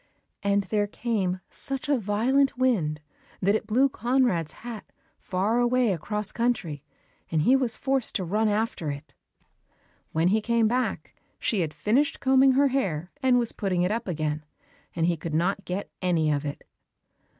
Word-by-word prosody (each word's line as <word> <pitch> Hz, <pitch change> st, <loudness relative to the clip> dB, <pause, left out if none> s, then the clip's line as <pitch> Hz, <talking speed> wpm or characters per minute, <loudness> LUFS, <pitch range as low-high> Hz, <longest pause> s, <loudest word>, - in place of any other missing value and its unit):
And 200 Hz, 0 st, +2 dB
there 205 Hz, +2 st, 0 dB
came 200 Hz, -5 st, -2 dB
such 275 Hz, +1 st, -2 dB
a 290 Hz, -, +3 dB
violent 250 Hz, +7 st, +1 dB
wind 180 Hz, -13 st, +1 dB, 0.4 s
that 200 Hz, +2 st, +2 dB
it 215 Hz, 0 st, -1 dB
blew 250 Hz, +6 st, +4 dB
Conrad's 240 Hz, -, +1 dB
hat 230 Hz, -4 st, -6 dB, 0.4 s
far 200 Hz, +6 st, 0 dB
away 245 Hz, -3 st, +3 dB
across 210 Hz, +5 st, -3 dB
country, 190 Hz, -, -1 dB, 0.5 s
and 155 Hz, -2 st, +1 dB
he 255 Hz, +9 st, +5 dB
was 255 Hz, -4 st, 0 dB
forced 270 Hz, -3 st, 0 dB
to 190 Hz, -, 0 dB
run 210 Hz, +5 st, +1 dB
after 210 Hz, -7 st, -1 dB
it. 145 Hz, +2 st, -7 dB, 1.0 s
When 165 Hz, +3 st, +2 dB
he 215 Hz, +3 st, +2 dB
came 230 Hz, 0 st, +2 dB
back 250 Hz, +3 st, -1 dB, 0.2 s
she 220 Hz, -, 0 dB
had 160 Hz, -4 st, 0 dB
finished 275 Hz, -, +1 dB
combing 265 Hz, 0 st, +5 dB
her 280 Hz, +1 st, +4 dB
hair 185 Hz, -, -1 dB
and 260 Hz, -2 st, +4 dB
was 235 Hz, -2 st, +1 dB
putting 185 Hz, -4 st, -1 dB
it 180 Hz, -, +1 dB
up 230 Hz, 0 st, -2 dB
again, 155 Hz, -3 st, -2 dB, 0.5 s
and 165 Hz, -1 st, +1 dB
he 170 Hz, -1 st, +1 dB
could 155 Hz, 0 st, -4 dB
not 195 Hz, +4 st, 0 dB
get 185 Hz, +3 st, -4 dB
any 165 Hz, -4 st, +2 dB
of 145 Hz, 0 st, -1 dB
it. 145 Hz, -, -5 dB
210 Hz, 165 wpm, -26 LUFS, 175-245 Hz, 1.0 s, he